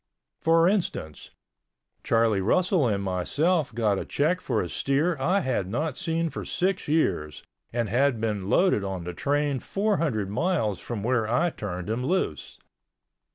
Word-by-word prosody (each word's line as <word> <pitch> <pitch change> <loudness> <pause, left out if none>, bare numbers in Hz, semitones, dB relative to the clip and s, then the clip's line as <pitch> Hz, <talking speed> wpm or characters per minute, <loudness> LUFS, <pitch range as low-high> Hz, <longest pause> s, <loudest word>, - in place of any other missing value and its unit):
For 165 +1 +4
instance, 175 - -2 0.7
Charlie 115 -3 +2
Russell 175 - +2
and 100 -3 0
myself 140 - 0
got 105 -4 +1
a - - -3
check 170 +6 0
for 115 -5 -1
a - - -4
steer 145 - 0
I 185 +9 +2
had 115 - -1
not 150 +6 -2
seen 165 0 -1
for - - -5
six 190 +1 -1
years 90 - 0 0.3
and 120 -1 -1
had 125 +3 +2
been 105 -3 -2
loaded 180 - +3
on 95 -3 -4
the 90 +1 -5
train 145 - 0
four 205 - 0
hundred 110 -12 -1
miles 115 - 0
from 115 -4 -5
where 115 -2 +1
I 170 +7 +2
turned 90 - -5
him 115 +3 -2
loose. 135 - -2
125 Hz, 155 wpm, -26 LUFS, 100-165 Hz, 0.7 s, For